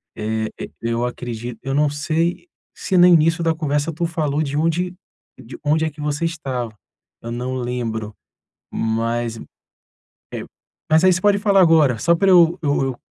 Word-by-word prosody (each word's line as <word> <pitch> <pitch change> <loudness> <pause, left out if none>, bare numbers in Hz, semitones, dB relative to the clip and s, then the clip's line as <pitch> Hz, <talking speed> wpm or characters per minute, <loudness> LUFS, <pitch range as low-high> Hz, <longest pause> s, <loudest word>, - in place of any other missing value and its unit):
Eh, 110 +1 -2
e - - -6
eu 115 +1 -1
acredito 120 -1 -6
eu 135 0 -3
não 145 +1 +3
sei 160 - -1 0.3
se 190 - -3
no 175 - +8
início 165 0 +4
da 165 -1 +2
conversa 150 -1 -1
tu 170 +3 -2
falou 155 -3 -1
de 145 -2 -3
onde 170 +3 0 0.4
de 120 +2 -11
onde 155 +2 +2
é - - -1
que 150 - -19
você 150 +2 -1
estava, 135 -8 -3 0.5
eu 115 - -6
não 125 +2 -3
lembro, 115 -4 -4 0.6
mas, 115 +1 -1 1.0
eh, - - -4 0.5
mas 160 +2 +4
aí 185 0 +6
você 185 - -2
pode 205 0 +4
falar 200 -2 +4
agora, 160 -8 +4
só 170 +7 +3
pra 195 +3 +2
eu 175 -1 +5
eu 145 -2 +1
eu 130 -2 -3
150 Hz, 175 wpm, -20 LUFS, 120-165 Hz, 1.0 s, no